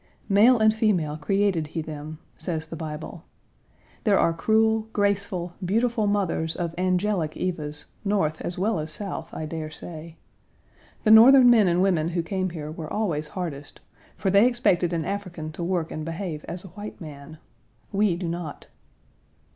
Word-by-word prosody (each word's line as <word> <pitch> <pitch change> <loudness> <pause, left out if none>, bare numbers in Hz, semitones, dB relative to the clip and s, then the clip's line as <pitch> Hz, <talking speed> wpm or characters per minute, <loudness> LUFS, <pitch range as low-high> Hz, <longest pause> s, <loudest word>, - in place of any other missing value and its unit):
"Male 220 +6 +6
and 220 -1 +4
female, 190 -9 +1
created 185 0 0
he 160 +2 -4
them," 155 0 -7 0.2
says 160 -3 -4
the 165 - -8
Bible. 160 +1 -7 0.8
There 205 -4 +4
are 165 - +3
cruel, 220 +5 +2
graceful, 200 -4 0
beautiful 225 +3 +1
mothers 185 -5 0
of 170 -2 -3
angelic 185 -2 0
Evas 150 -5 -4 0.2
North 195 -7 0
as 175 - -4
well 195 0 0
as 155 +1 -4
South, 195 +4 -4
I 155 - -5
dare 155 0 -5
say. 160 +1 -9 0.9
The 215 - +4
Northern 245 +3 +9
men 220 -5 +5
and 175 +1 +3
women 175 -5 +2
who 170 0 -1
came 185 +2 -2
here 155 -3 -6
were 155 -1 -7
always 165 -8 -1
hardest, 150 -5 -6 0.4
for 190 - 0
they 200 +5 +6
expected 185 -8 +2
an 165 -2 -1
African 180 -6 -4
to 165 +3 -6
work 170 -2 -1
and 155 - -4
behave 165 -1 -5
as 175 0 -6
a 190 - -10
white 210 +3 -9
man. 150 -1 -10 0.5
We 200 -3 +2
do 175 0 -4
not. 170 -2 -5
175 Hz, 165 wpm, -25 LUFS, 160-205 Hz, 0.9 s, Northern